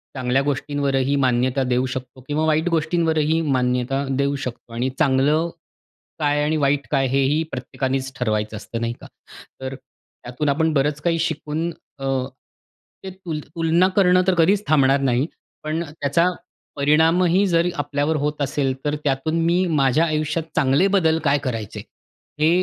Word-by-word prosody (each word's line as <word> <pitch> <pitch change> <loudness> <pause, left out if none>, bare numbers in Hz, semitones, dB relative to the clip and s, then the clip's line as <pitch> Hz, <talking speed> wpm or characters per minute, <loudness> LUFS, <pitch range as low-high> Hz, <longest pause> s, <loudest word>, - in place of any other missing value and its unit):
चांगल्या 130 0 +1
गोष्टींवरही 140 -1 0
मान्यता 130 0 +1
देऊ 125 0 +1
शकतो 130 0 -6
किंवा 150 +2 0
वाईट 160 +2 +1
गोष्टींवरही 160 -1 +1
मान्यता 130 -2 0
देऊ 140 +1 +1
शकतो. 125 -3 -7
आणि 120 +3 -1
चांगलं 150 +3 +2 0.7
काय? 145 -1 +1
आणि 155 +1 +1
वाईट 140 -1 +1
काय? 135 -1 +2
हे 135 +2 +1
ही 145 +4 +2
प्रत्येकानेच 130 +1 -3
ठरवायचं 110 -2 -1
असतं, 115 +3 -6
नाही 115 0 -1
का? - - -10 0.5
तर 130 0 -4
त्यातून 130 +1 -7
आपण 160 +3 +2
बरंच 145 +1 0
काही 165 0 0
शिकून 160 0 -2 0.3
अ, 135 - -3 1.0
ते 190 - -5
तुल 180 -4 -6 0.2
तुलना 165 +2 +3
करणं 185 -2 +5
तर 190 - +4
कधीच 190 +5 +3
थांबणार 140 -2 +4
नाही. 130 +1 +1 0.4
पण 155 +2 -2
त्याचा 150 +1 0 0.5
परिणामही 165 +6 +3
जर 170 -1 +2
आपल्यावर 145 +1 -1
होत 150 0 -3
असेल 140 -1 0
तर 145 0 0
त्यातून 145 +4 0
मी 175 +2 +2
माझ्या 150 -1 +2
आयुष्यात 155 +1 -1
चांगले 140 +7 +3
बदल 160 -4 +3
काय 145 -2 +3
करायचे, 115 -6 -4 0.6
हे 155 +1 +4
145 Hz, 150 wpm, -22 LUFS, 130-160 Hz, 1.0 s, करणं